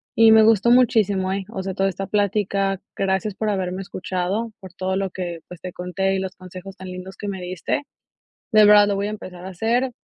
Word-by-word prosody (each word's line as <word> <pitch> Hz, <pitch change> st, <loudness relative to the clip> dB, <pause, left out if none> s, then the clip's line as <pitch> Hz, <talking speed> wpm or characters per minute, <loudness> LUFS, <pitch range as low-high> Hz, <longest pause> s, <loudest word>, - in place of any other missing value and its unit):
Y 225 Hz, 0 st, +7 dB
me 220 Hz, 0 st, +8 dB
gustó 220 Hz, 0 st, +4 dB
muchísimo, 210 Hz, -6 st, +3 dB
¿eh? 195 Hz, 0 st, -2 dB
O 190 Hz, -4 st, -4 dB
sea, 190 Hz, 0 st, -3 dB
toda 195 Hz, +1 st, +1 dB
esta 195 Hz, +1 st, -4 dB
plática, 200 Hz, -1 st, 0 dB, 0.2 s
gracias 195 Hz, +1 st, 0 dB
por 215 Hz, +2 st, -2 dB
haberme 185 Hz, -1 st, -2 dB
escuchado, 190 Hz, +4 st, -3 dB
por 190 Hz, -3 st, -12 dB
todo 190 Hz, 0 st, -2 dB
lo 195 Hz, 0 st, -1 dB
que, 175 Hz, -2 st, -5 dB
pues, 180 Hz, -, -11 dB
te 185 Hz, -1 st, -7 dB
conté, 190 Hz, +2 st, -1 dB
y -, -, 0 dB
los 190 Hz, 0 st, -5 dB
consejos 185 Hz, +1 st, -10 dB
tan 190 Hz, 0 st, -10 dB
lindos 185 Hz, +1 st, -8 dB
que 205 Hz, -, -6 dB
me 190 Hz, -2 st, -5 dB
diste, 180 Hz, +6 st, -2 dB, 0.7 s
de 215 Hz, -2 st, +7 dB
verdad, 205 Hz, 0 st, +7 dB
lo 200 Hz, -, 0 dB
voy 200 Hz, +1 st, -1 dB
a -, -, -3 dB
empezar 185 Hz, -4 st, -9 dB
a 190 Hz, -, -5 dB
hacer. 235 Hz, +7 st, 0 dB
195 Hz, 220 wpm, -22 LUFS, 185-210 Hz, 0.7 s, me